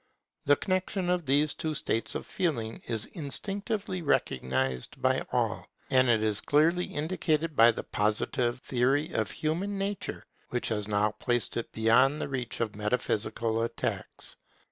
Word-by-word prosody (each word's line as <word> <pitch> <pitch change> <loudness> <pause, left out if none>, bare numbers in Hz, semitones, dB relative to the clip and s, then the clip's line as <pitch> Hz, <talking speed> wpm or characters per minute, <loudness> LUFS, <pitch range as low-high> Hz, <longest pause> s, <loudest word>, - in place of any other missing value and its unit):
The 145 - +6
connexion 185 +1 -1
of 175 -4 0
these 145 +2 +3
two 155 -1 -3
states 115 -4 -1
of - - -3
feeling 115 -11 -2
is 110 -2 -1
instinctively 195 +5 -3
recognized 65 - 0
by - - +2
all; - - 0 0.2
and 130 -1 +5
it 110 -2 +4
is 105 -1 0
clearly 165 +5 +3
indicated 155 0 -1
by 115 -1 +8
the - - -1
Positive 120 +3 0
theory 135 +6 +1
of - - 0
human 180 +6 -2
nature, 195 0 -3 0.2
which 125 - -1
has 105 -3 -2
now 105 0 +2
placed 120 +2 -1
it 120 - -3
beyond 120 +6 +4
the - - -2
reach 125 -3 -3
of 110 -3 -1
metaphysical 110 +1 0
attacks. 115 +1 -3
130 Hz, 145 wpm, -29 LUFS, 110-160 Hz, 0.2 s, by